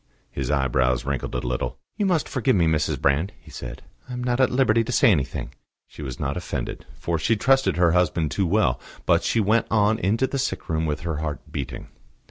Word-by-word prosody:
His 65 -3 -3
eyebrows 65 -3 +1
wrinkled 70 -2 -3
a - - -2
little. - - -2 0.2
"You 205 - 0
must 175 -5 +1
forgive 130 -1 +1
me, 85 -3 +3
Mrs. 80 -2 +1
Brand," 70 +7 +1
he - - -16
said. - - -8 0.3
"I - - -5
am 125 0 -4
not 125 0 0
at 130 - +5
liberty 115 -3 +3
to 115 - -4
say 115 - +5
anything." 70 -9 -1 0.3
She - - -13
was 65 -4 -6
not - - -2
offended, - - -5
for 85 -1 -2
she 115 +9 +2
trusted 135 -1 +3
her 85 -2 +4
husband 85 -3 +1
too 95 -3 0
well; 85 - +2 0.2
but - - +4
she 115 - +1
went 110 +2 +2
on 110 0 +3
into 110 +8 +2
the 135 +1 -3
sick 130 - -3
room 80 0 0
with 75 0 -2
her 80 -2 -3
heart 75 -1 -5
beating. 65 -3 -5
85 Hz, 215 wpm, -24 LUFS, 70-115 Hz, 0.3 s, at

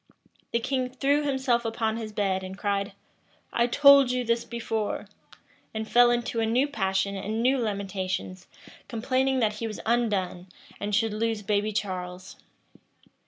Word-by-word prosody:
The - - +2
king 255 +1 -1
threw 275 +3 +1
himself 265 -4 +1
upon 225 -1 -1
his 220 -2 -5
bed, 195 -3 0
and 190 +1 -7
cried, 200 -1 -1 0.6
"I 235 0 +3
told 280 +1 +7
you 250 0 0
this 230 0 0
before;" 225 -2 -3 0.7
and 220 0 -3
fell 240 +2 +6
into 240 -1 0
a 225 - +2
new 250 +5 +2
passion 195 -6 -1
and 215 +4 -2
new 260 +2 +3
lamentations, 195 -4 -3 0.4
complaining 260 +2 0
that 215 -1 +1
he 230 - -3
was 215 - -6
undone, 200 -6 0 0.3
and 205 0 -1
should 225 0 +1
lose 220 -1 -1
baby 210 +1 0
Charles. 185 -3 -4
225 Hz, 150 wpm, -27 LUFS, 200-245 Hz, 0.7 s, told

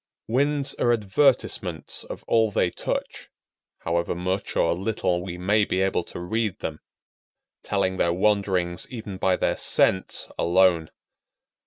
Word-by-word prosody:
Winds 140 +4 +1
are 120 - +3
advertisements 105 - 0
of - - -8
all 110 -1 +3
they 90 -3 +1
touch, - - -4 0.5
however 85 +1 -1
much 95 +2 -3
or - - +2
little 95 -1 -1
we 90 -1 -6
may 105 +4 +2
be 95 - -1
able 95 -2 +1
to - - -8
read 110 +3 -2
them; 75 -1 -5 0.8
telling 95 -2 -1
their 85 - +2
wanderings 95 -2 0
even 110 -6 -7
by 95 0 +2
their - - 0
scents 95 0 +2
alone. 85 -2 +3
95 Hz, 135 wpm, -24 LUFS, 90-105 Hz, 0.8 s, are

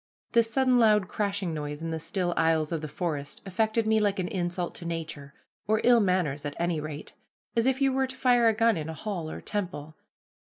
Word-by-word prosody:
This 230 -1 +3
sudden 255 -1 +3
loud 210 -4 +4
crashing 200 -4 -2
noise 150 0 -5
in 165 - -3
the 160 - -2
still 175 +2 -2
aisles 160 -1 +2
of 165 -2 -2
the 155 - -4
forest 150 -2 -4
affected 220 +4 0
me 220 0 +3
like 205 -1 +1
an 185 -2 -1
insult 175 -1 -2
to 170 - -9
nature, 155 -4 -5 0.3
or 215 +1 +3
ill 240 -1 +6
manners 180 -8 +1
at 145 -1 -4
any 170 -2 0
rate, 150 0 -7 0.4
as 230 +2 +2
if 265 +1 +2
you 270 -1 +3
were 265 0 +1
to 260 - -7
fire 245 -3 +4
a 225 - +5
gun 230 -2 +3
in 155 0 -4
a 160 - -5
hall 180 -5 -4
or - - -6
temple. 175 -7 -4
185 Hz, 215 wpm, -28 LUFS, 160-220 Hz, 0.4 s, ill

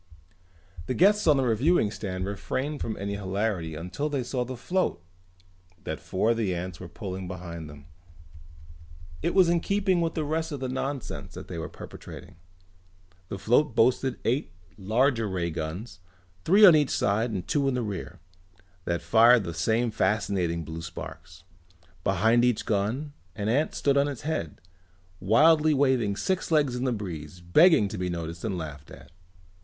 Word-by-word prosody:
The 130 - -1
guests 205 +1 +4
on 150 -3 +6
the 135 - +2
reviewing 120 +1 +2
stand 95 -3 -4
refrained 130 +9 -3
from 110 - -3
any 100 +1 -3
hilarity 95 -4 -2
until 90 - -4
they 140 -3 -1
saw 125 +1 -2
the 125 +1 -7
float 180 - -1 0.8
that - - -4
four 105 +5 0
of 115 - 0
the 100 -6 0
ants 90 0 -5
were 90 - -8
pulling 95 +1 -6
behind 85 -3 -7
them. 70 -1 -13 1.4
It 170 +3 -1
was 185 -3 +6
in 170 0 +3
keeping 195 -1 +1
with 165 -1 -1
the 155 - -1
rest 160 +2 -2
of 145 - -4
the 130 - -3
nonsense 135 +1 -4
they 85 -3 -7
were 80 - -5
perpetrating. - - -11 0.9
The 100 - -4
float 120 +6 +2
boasted 125 +2 +2
eight 125 +5 0 0.2
larger 115 +4 +1
ray 90 -3 -2
guns, 85 +6 -6 0.5
three 205 +5 +7
on 175 -5 +9
either 150 -3 +3
side 110 +4 +1
and 95 -5 -4
two 140 -2 +1
in 135 - +1
the 125 - -1
rear, 100 -5 -6 0.7
that 85 0 -2
fired 115 0 +6
the 85 -2 -5
same 115 +7 +1
fascinating 95 -5 0
blue 80 +1 -7
sparks. 80 -1 -9 0.6
Behind 110 +5 +3
each 125 -3 +1
gun 115 +8 -1 0.2
an 105 0 -2
ant 145 +7 +1
stood 140 -1 +2
on 140 +1 +3
its 140 -5 -5
head, 145 - -3 0.6
wildly 150 - +4
waving 130 -7 +2
six 185 - -1
legs 145 -6 +2
in 125 +1 -2
the 130 - +1
breeze, 90 -7 -6
begging 105 - +5
to - - -6
be 90 0 -2
noticed 85 -1 -5
and 100 -5 -2
laughed 75 -3 -7
at. - - -14
110 Hz, 170 wpm, -27 LUFS, 90-140 Hz, 1.4 s, on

